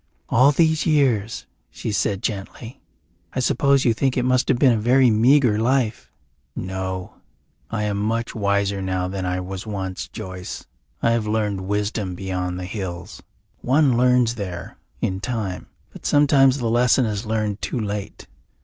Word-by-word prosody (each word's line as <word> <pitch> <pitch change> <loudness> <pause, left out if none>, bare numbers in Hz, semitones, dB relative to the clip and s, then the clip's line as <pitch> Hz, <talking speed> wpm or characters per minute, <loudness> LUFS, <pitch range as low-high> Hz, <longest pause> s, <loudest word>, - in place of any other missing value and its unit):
"All 130 +4 +5
these 160 +1 +2
years," 120 -8 +1 0.2
she - - -5
said 100 -1 -1
gently, 110 +3 -5 0.5
"I - - -2
suppose 140 +2 +2
you 120 - +4
think 130 +3 0
it 125 - +1
must 130 0 +2
have 130 - +3
been 130 0 +5
a 115 - +1
very 125 +2 +4
meagre 120 0 +4
life?" 120 -1 0 0.5
"No. 95 0 -5 0.5
I 110 -2 -2
am 105 -1 -1
much 115 +3 -1
wiser 100 -2 0
now 95 -1 -1
than 95 0 -3
I 90 0 -1
was 95 +3 -7
once, 95 -3 -4
Joyce. 90 -1 -7 0.4
I 115 - +4
have 115 -2 0
learned 105 -3 -1
wisdom 105 -2 -2
beyond 90 -1 -3
the 90 - -5
hills. 90 -3 -6 0.4
One 135 0 +3
learns 125 -1 +3
there 90 -6 -7 0.2
in 95 0 -1
time 105 -5 -4 0.3
but - - -12
sometimes 140 -2 +4
the 120 -4 -2
lesson 120 +2 +3
is 105 0 -3
learned 110 -2 -1
too 125 - -2
late. 105 -2 -5
110 Hz, 160 wpm, -22 LUFS, 95-125 Hz, 0.5 s, All